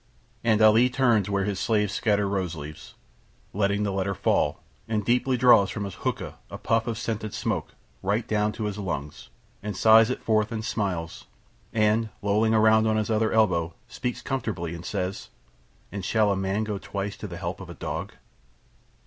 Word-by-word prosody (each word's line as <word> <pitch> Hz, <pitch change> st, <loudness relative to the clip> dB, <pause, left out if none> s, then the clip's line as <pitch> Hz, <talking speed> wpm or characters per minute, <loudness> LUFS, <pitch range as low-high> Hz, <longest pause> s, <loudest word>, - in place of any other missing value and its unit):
And 110 Hz, -2 st, +3 dB
Ali 110 Hz, +3 st, +6 dB
turns 120 Hz, -6 st, +2 dB
where 100 Hz, -1 st, +1 dB
his 100 Hz, -1 st, -2 dB
slaves 105 Hz, -1 st, +1 dB
scatter 105 Hz, -2 st, +1 dB
rose 95 Hz, -4 st, -2 dB
leaves, 75 Hz, 0 st, -9 dB, 0.6 s
letting 100 Hz, +1 st, +1 dB
the 100 Hz, -, 0 dB
letter 95 Hz, 0 st, -1 dB
fall, -, -, +1 dB, 0.2 s
and 110 Hz, -2 st, -1 dB
deeply 125 Hz, +2 st, +2 dB
draws 115 Hz, -5 st, +6 dB
from 105 Hz, -, -4 dB
his 100 Hz, -2 st, -5 dB
hookah -, -, -4 dB
a -, -, -7 dB
puff 115 Hz, 0 st, 0 dB
of 115 Hz, -, -1 dB
the -, -, -7 dB
scented 110 Hz, -2 st, -3 dB
smoke, -, -, -3 dB, 0.3 s
right 105 Hz, +4 st, 0 dB
down 105 Hz, -1 st, +1 dB
into 105 Hz, +1 st, -4 dB
his 105 Hz, -1 st, -3 dB
lungs, 75 Hz, -7 st, -5 dB, 0.3 s
and 105 Hz, 0 st, -5 dB
sighs 110 Hz, +1 st, +6 dB
it 130 Hz, -, -3 dB
forth 110 Hz, -1 st, +1 dB
and 110 Hz, -1 st, -3 dB
smiles, 90 Hz, -8 st, -3 dB, 0.4 s
and 110 Hz, +1 st, +2 dB
lolling 110 Hz, +2 st, +2 dB
round 110 Hz, 0 st, +5 dB
on 110 Hz, -, +2 dB
to -, -, +2 dB
his 105 Hz, -, -3 dB
other 110 Hz, 0 st, +2 dB
elbow 85 Hz, -7 st, +2 dB
speaks 125 Hz, 0 st, -4 dB
comfortably 105 Hz, -11 st, -3 dB
and 85 Hz, 0 st, -8 dB
says, 95 Hz, -1 st, -3 dB, 0.6 s
"And 100 Hz, 0 st, -5 dB
shall 105 Hz, +2 st, +2 dB
a -, -, +1 dB
man 95 Hz, +2 st, -1 dB
go 105 Hz, -2 st, -3 dB
twice 100 Hz, +1 st, -4 dB
to 105 Hz, -, -6 dB
the 85 Hz, -2 st, -7 dB
help 90 Hz, +2 st, -5 dB
of 90 Hz, -, -9 dB
a 85 Hz, -, -8 dB
dog?" -, -, -5 dB
105 Hz, 190 wpm, -26 LUFS, 95-110 Hz, 0.6 s, Ali